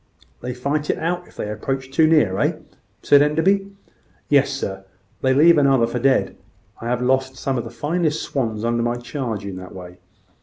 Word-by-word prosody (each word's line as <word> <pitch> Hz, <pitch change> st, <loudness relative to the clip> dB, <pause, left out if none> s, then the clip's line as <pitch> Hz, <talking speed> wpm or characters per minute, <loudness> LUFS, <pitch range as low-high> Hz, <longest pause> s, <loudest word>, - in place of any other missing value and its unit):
"They 125 Hz, 0 st, -5 dB
fight 145 Hz, +4 st, -2 dB
it -, -, +1 dB
out, 175 Hz, +2 st, -2 dB
if -, -, -20 dB
they -, -, -4 dB
approach 130 Hz, +5 st, -4 dB
too 155 Hz, +3 st, +4 dB
near, 150 Hz, -13 st, +3 dB
eh?" -, -, +2 dB, 0.5 s
said 145 Hz, -, +6 dB
Enderby. 185 Hz, +7 st, +2 dB, 0.6 s
"Yes, 140 Hz, -1 st, +4 dB
sir; 95 Hz, -8 st, -4 dB, 0.4 s
they 130 Hz, -, +2 dB
leave 160 Hz, +5 st, +6 dB
one 140 Hz, -1 st, +4 dB
another 135 Hz, -4 st, +4 dB
for 115 Hz, +1 st, -3 dB
dead. 135 Hz, +2 st, +2 dB, 0.5 s
I 115 Hz, -, -5 dB
have 125 Hz, +1 st, -1 dB
lost 130 Hz, +1 st, 0 dB
some 135 Hz, +1 st, -2 dB
of 120 Hz, -, -2 dB
the -, -, -6 dB
finest 160 Hz, 0 st, -1 dB
swans 115 Hz, -5 st, -2 dB
under 120 Hz, 0 st, 0 dB
my 120 Hz, +1 st, 0 dB
charge 120 Hz, -4 st, -5 dB
in 95 Hz, -2 st, -6 dB
that 90 Hz, 0 st, -10 dB
way." 90 Hz, -1 st, -10 dB
130 Hz, 195 wpm, -21 LUFS, 115-150 Hz, 0.6 s, said